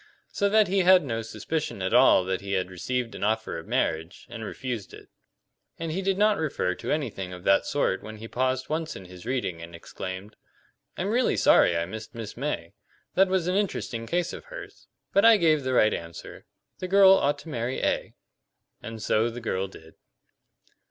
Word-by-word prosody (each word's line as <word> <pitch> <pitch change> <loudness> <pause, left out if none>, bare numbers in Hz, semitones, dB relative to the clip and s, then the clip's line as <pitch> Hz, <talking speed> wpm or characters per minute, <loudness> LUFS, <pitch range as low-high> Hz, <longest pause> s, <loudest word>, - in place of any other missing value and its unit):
So 200 - +1
that 215 0 +4
he 195 +2 +1
had 185 -1 +6
no 115 -3 -2
suspicion 120 +2 -4
at 95 - -1
all 125 -7 +6
that 95 0 -2
he 100 0 -4
had 95 -1 -1
received 120 +6 -3
an - - -6
offer 110 -4 -1
of 80 - -12
marriage 80 +3 -1
and 115 -2 -6
refused 120 -1 -5
it. - - -15 0.7
And 165 -1 -4
he 185 +5 -2
did 195 0 0
not 210 0 +3
refer 145 -12 -1
to - - -5
anything 115 -11 -2
of 90 -1 -9
that 100 - +3
sort 145 -9 0
when 110 0 -9
he 110 +1 -8
paused 130 +2 -1
once 160 +1 -3
in 95 - -9
his 90 +3 -12
reading 120 -10 -2
and 85 0 -9
exclaimed: 95 +4 -7 0.6
"I'm 190 - -1
really 245 +4 +2
sorry 85 - +5
I 85 - 0
missed 110 +5 -8
Miss 115 -3 -7
May. 120 - -4 0.4
That 190 +1 +4
was 185 -2 0
an 180 - 0
interesting 155 - -2
case 175 +3 -1
of - - -9
hers. - - -11 0.3
But 200 - +4
I 225 -1 +8
gave 160 -5 +3
the 130 -1 -2
right 110 -3 +4
answer; 85 0 -8 0.3
the 185 - -4
girl 195 0 +7
ought 145 -6 +3
to 160 - -11
marry 120 -2 -3
A." - - -1 0.7
And 115 -1 -7
so 110 +2 +2
the 120 +1 -7
girl 95 -5 -2
did. 80 -4 -15
120 Hz, 200 wpm, -26 LUFS, -, 0.7 s, I